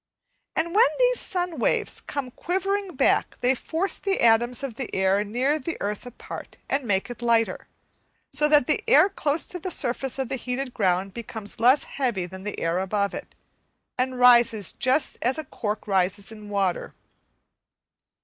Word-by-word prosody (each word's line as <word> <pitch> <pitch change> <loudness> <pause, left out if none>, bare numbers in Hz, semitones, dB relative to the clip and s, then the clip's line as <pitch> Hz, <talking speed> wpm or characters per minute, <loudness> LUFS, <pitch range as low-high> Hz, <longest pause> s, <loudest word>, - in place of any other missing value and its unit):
And 335 +1 -1
when 460 +4 +6
these - - +3
sun 355 -5 -3
waves - - 0
come 275 -3 -5
quivering 385 +3 -2
back 265 - +2
they 250 +1 +3
force 330 +8 -1
the 390 -1 -1
atoms 240 +3 +3
of 270 -4 -4
the 245 +1 -5
air 190 +1 +2
near 255 +8 0
the 335 +4 -4
earth 210 +4 -4
apart 245 - -9
and 275 -1 -1
make 200 +2 0
it 240 - -9
lighter; 230 -1 +1 0.7
so 300 - +3
that 295 -4 +5
the 305 - 0
air 430 -4 +6
close 305 -5 0
to 360 - -8
the 370 - -4
surface 265 -4 -1
of 265 -2 -2
the 265 - -3
heated 250 +1 -4
ground 190 -2 0
becomes 220 -2 -7
less 255 +5 +5
heavy 240 -10 -2
than 190 +1 -10
the 210 - -4
air 165 +2 0
above 200 +1 -1
it, - - -8 0.6
and 255 0 -1
rises 240 -5 +5
just 260 +3 +1
as 255 +4 +1
a 315 - -3
cork 215 -4 -4
rises 195 +1 0
in 215 -1 -11
water. 195 -3 -1
245 Hz, 170 wpm, -25 LUFS, 210-295 Hz, 0.7 s, when